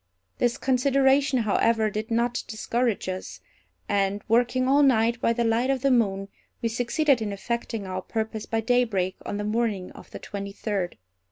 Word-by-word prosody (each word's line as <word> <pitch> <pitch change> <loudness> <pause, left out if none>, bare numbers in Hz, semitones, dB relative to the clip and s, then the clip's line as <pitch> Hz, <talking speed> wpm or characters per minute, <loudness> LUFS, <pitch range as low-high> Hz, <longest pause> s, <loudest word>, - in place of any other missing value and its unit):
This 240 -1 +1
consideration, 270 0 +3
however, 220 +1 +2
did 215 +3 -4
not 235 +1 0
discourage 230 0 -1
us; 185 0 -5 0.5
and, 200 0 0
working 245 +3 +2
all 280 +2 +5
night 235 -3 +3
by - - +3
the 235 0 0
light 230 +3 +1
of 270 -1 0
the 275 - +3
moon, 195 -5 +1 0.3
we 230 - -1
succeeded 245 +3 +1
in 210 -2 -2
effecting 225 +1 -3
our 185 0 -4
purpose 220 +1 -4
by 225 0 0
daybreak 225 -6 +1
on 205 - -3
the 205 - -3
morning 210 -3 -1
of - - -14
the - - -8
twenty 200 -1 -6
third. 200 -4 -3
230 Hz, 170 wpm, -25 LUFS, 205-245 Hz, 0.5 s, all